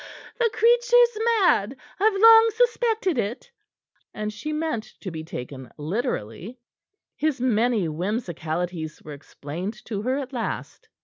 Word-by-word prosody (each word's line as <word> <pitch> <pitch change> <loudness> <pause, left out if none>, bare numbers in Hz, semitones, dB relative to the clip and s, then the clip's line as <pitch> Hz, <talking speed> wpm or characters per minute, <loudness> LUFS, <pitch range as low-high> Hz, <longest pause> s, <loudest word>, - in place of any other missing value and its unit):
"The 470 -2 +3
creature's 475 +1 +4 0.2
mad 260 - +2 0.2
I've 405 0 +2
long 450 +1 +8
suspected 450 - +1
it." 230 - -4 0.6
And 215 0 -4
she 230 +9 -5
meant 305 -7 -3
to 185 - -5
be 160 -1 -6
taken 130 -4 -8
literally; 180 - -4 0.6
his 305 -3 -1
many 235 -4 +1
whimsicalities 170 -2 -4
were 150 - -8
explained 170 +9 -7
to 205 -3 -4
her 255 +4 -1
at 275 -1 -6
last. 240 -3 -5
235 Hz, 125 wpm, -24 LUFS, -, 0.6 s, long